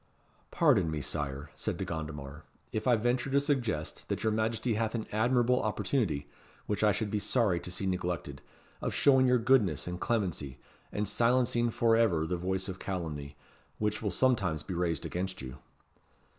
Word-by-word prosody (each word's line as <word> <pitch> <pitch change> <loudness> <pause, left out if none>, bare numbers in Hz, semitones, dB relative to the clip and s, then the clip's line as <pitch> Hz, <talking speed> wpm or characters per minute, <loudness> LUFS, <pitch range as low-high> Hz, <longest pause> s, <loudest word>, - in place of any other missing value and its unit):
"Pardon 80 - +3
me, 80 -1 -2
Sire," 70 0 -4
said - - -3
De - - -3
Gondomar, 75 -2 -6 0.3
"if 110 - -2
I 125 - +6
venture 120 +4 0
to 140 +1 +4
suggest 125 - -1
that - - -2
your 110 - +2
Majesty 110 +2 0
hath 110 +1 -1
an 110 - -2
admirable 120 +3 +3
opportunity, 105 - -1 0.4
which 105 0 -1
I 105 - +6
should 105 +2 -2
be 105 - 0
sorry 105 -5 +2
to - - -7
see 95 +2 -3
neglected, 90 -7 -2 0.4
of - - -2
showing 130 -2 +5
your 125 0 +5
goodness 115 - +3
and 90 0 -5
clemency, 90 - -1 0.3
and 105 0 -1
silencing 120 +2 +2
for 115 0 +3
ever 95 -9 +3
the 90 - -1
voice 95 +2 -2
of 95 -1 -5
calumny, 75 -7 -4 0.4
which 105 0 -1
will 105 - 0
sometimes 95 - +1
be 95 - -5
raised 85 -3 -1
against 95 +1 -3
you." 65 -1 -8
105 Hz, 170 wpm, -31 LUFS, 80-115 Hz, 0.4 s, I